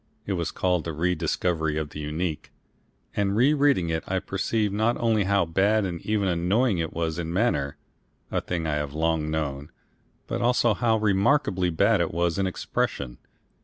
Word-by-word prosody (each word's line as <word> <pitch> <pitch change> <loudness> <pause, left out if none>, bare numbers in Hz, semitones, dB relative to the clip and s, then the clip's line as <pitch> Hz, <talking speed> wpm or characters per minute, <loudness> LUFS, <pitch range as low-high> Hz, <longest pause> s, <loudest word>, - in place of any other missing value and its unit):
It 100 - -1
was 85 -3 -1
called 90 -3 0
the 80 - -4
"Rediscovery 80 -1 0
of 75 -2 -3
the - - -7
Unique," 75 +2 -3 0.6
and 100 -1 +1
re 130 +7 +4
reading 140 - +2
it 80 0 -1
I 95 - 0
perceive 100 +2 -1
not 110 +3 +1
only 110 -4 +2
how 100 -1 +2
bad 100 +5 +2
and 85 -3 -4
even 105 -2 0
annoying 95 +5 +1
it 80 -1 -2
was 80 0 -2
in 85 -1 -3
manner 80 -8 0 0.5
a - - 0
thing 85 -2 -3
I 75 -1 0
have 75 -1 -4
long 80 -1 0
known 75 -2 -3 0.6
but - - -3
also 120 -1 +3
how 115 0 +2
remarkably 100 -2 +2
bad 100 +5 +3
it 85 - -1
was 85 +1 0
in 95 - +1
expression. 70 -7 -3
90 Hz, 175 wpm, -26 LUFS, 80-105 Hz, 0.6 s, re